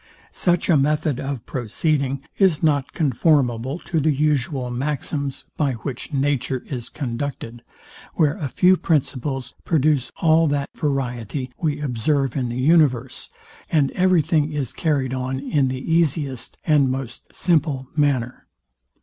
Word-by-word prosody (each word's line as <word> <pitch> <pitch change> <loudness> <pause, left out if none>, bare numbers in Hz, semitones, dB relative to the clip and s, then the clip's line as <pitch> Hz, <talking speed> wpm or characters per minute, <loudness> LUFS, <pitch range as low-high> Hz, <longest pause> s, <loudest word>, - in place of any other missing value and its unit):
Such 175 -1 +1
a 170 - +5
method 150 -1 +1
of 135 -4 -4
proceeding 135 +2 -1 0.2
is 185 -7 +3
not 145 -3 +2
conformable 135 -3 +1
to 165 - 0
the 155 +1 +2
usual 140 -3 0
maxims, 140 +1 -3
by 145 -4 +1
which 125 +4 -6
nature 135 -2 0
is 125 -4 -5
conducted, 120 -3 -5 0.5
where 150 -2 +2
a 155 -8 -3
few 185 +6 +4
principles 135 -5 -1
produce 150 -4 +1
all 160 0 +4
that 145 -1 -1
variety 130 -3 -2
we 150 -3 -1
observe 135 0 0
in 130 -4 -1
the 120 - -4
universe, 130 -4 +2 0.4
and 145 -4 +3
every 185 -3 +3
thing 155 -1 +1
is 145 -5 -3
carryed 140 -5 0
on 130 0 -2
in 140 0 +1
the 130 +5 -2
easiest 145 -6 0
and 145 -4 +4
most 130 -1 -5
simple 150 -6 0
manner. 130 -5 0
140 Hz, 135 wpm, -22 LUFS, 130-155 Hz, 0.5 s, a